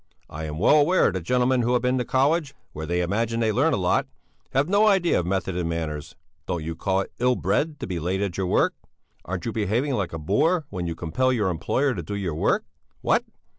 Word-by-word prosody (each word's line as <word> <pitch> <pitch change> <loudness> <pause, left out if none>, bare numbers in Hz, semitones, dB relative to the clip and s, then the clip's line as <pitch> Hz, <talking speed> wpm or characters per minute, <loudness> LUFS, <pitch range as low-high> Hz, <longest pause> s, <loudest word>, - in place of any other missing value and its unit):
I 80 +1 -5
am 75 0 -5
well 110 - +5
aware 180 +6 +3
that 95 0 -3
gentlemen 125 +6 +2
who 120 +1 +1
have 125 - +1
been 125 +1 +1
to - - 0
college, 140 +3 +1 0.2
where 80 +1 -6
they 90 +1 0
imagine 115 +6 -1
they 110 -1 +2
learn 140 +9 +2
a - - +1
lot, 90 -2 +1 0.4
have 135 +3 +1
no 205 +3 +4
idea 190 - +3
of 85 - -3
method 95 -1 -1
and 85 -2 -1
manners. 80 -3 -4 0.3
Don't 85 -3 -2
you 80 +1 -4
call 95 +3 0
it - - -7
ill 125 +1 +3
bred 150 +3 0
to - - -2
be 90 -2 -3
late 90 +4 -1
at 100 -4 -2
your 95 -1 -1
work? - - +2 0.5
Aren't 95 -1 -4
you 115 - -1
behaving 115 +7 0
like 100 -7 -1
a 80 - -4
boor 145 - +1
when 90 -2 -3
you 85 - -3
compel 90 +12 0
your 105 -6 +1
employer 130 - 0
to 95 - -4
do 95 +6 -5
your 95 -5 -2
work? 75 - +1 0.4
What? - - +2
100 Hz, 235 wpm, -24 LUFS, 85-130 Hz, 0.5 s, well